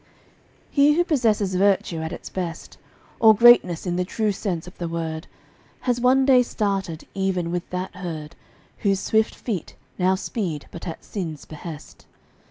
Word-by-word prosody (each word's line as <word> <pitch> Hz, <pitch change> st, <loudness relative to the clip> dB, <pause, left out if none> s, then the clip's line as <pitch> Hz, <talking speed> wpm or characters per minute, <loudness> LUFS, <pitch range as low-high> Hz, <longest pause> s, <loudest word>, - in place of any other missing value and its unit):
He 290 Hz, +1 st, +5 dB
who 345 Hz, +3 st, +3 dB
possesses 220 Hz, -, +1 dB
virtue 185 Hz, -3 st, +2 dB
at 160 Hz, 0 st, -4 dB
its -, -, -7 dB
best, 170 Hz, -3 st, -6 dB, 0.4 s
Or 220 Hz, -1 st, +7 dB
greatness 220 Hz, -7 st, +6 dB
in 175 Hz, -1 st, -1 dB
the 180 Hz, -, +1 dB
true 210 Hz, +3 st, -1 dB
sense 185 Hz, -4 st, -3 dB
of 180 Hz, -, -12 dB
the 175 Hz, -, -2 dB
word, 165 Hz, -1 st, -4 dB, 0.5 s
Has 245 Hz, -1 st, 0 dB
one 260 Hz, +2 st, +4 dB
day 260 Hz, -2 st, +6 dB
started 195 Hz, -8 st, -2 dB
even 185 Hz, -3 st, -1 dB
with 175 Hz, 0 st, -3 dB
that 180 Hz, +1 st, -4 dB
herd 165 Hz, -3 st, -6 dB, 0.4 s
Whose 195 Hz, -2 st, +1 dB
swift 220 Hz, +2 st, +1 dB
feet 200 Hz, -9 st, -4 dB, 0.2 s
now 185 Hz, +1 st, +3 dB
speed 185 Hz, -, -3 dB
but 170 Hz, -, -8 dB
at 165 Hz, -, -6 dB
sin's 165 Hz, -7 st, -5 dB
behest. 155 Hz, 0 st, -10 dB
185 Hz, 160 wpm, -23 LUFS, 170-220 Hz, 0.5 s, Or